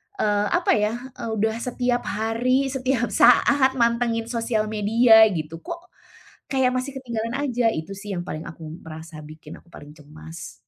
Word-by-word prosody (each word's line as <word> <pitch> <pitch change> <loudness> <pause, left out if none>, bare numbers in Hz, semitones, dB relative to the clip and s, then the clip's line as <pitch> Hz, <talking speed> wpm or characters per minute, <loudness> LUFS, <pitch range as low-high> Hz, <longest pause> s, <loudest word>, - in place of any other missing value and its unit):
eee, 210 - +1
apa - - +2
ya, 210 +2 0 0.2
e 245 -1 -11
udah 220 +1 0
setiap 245 0 -1
hari, 245 +6 0
setiap 255 -3 -1
saat 265 +2 +4
mantengin 235 -1 +1
sosial 225 -2 -1
media 220 +1 +6
gitu. 160 +1 -5
Kok 340 - -9 0.6
kayak 265 -2 +1
masih 255 +2 -3
ketinggalan 235 -2 -4
aja. 245 -4 +1
Itu 160 +5 -5
sih 195 -1 -6
yang 175 - -4
paling 155 -2 -6
aku 165 -1 -11 0.2
merasa, 160 0 -10
bikin 155 0 -12
aku - - -28
paling 145 -3 -13
cemas. 155 +3 -11
225 Hz, 155 wpm, -23 LUFS, 175-250 Hz, 0.6 s, media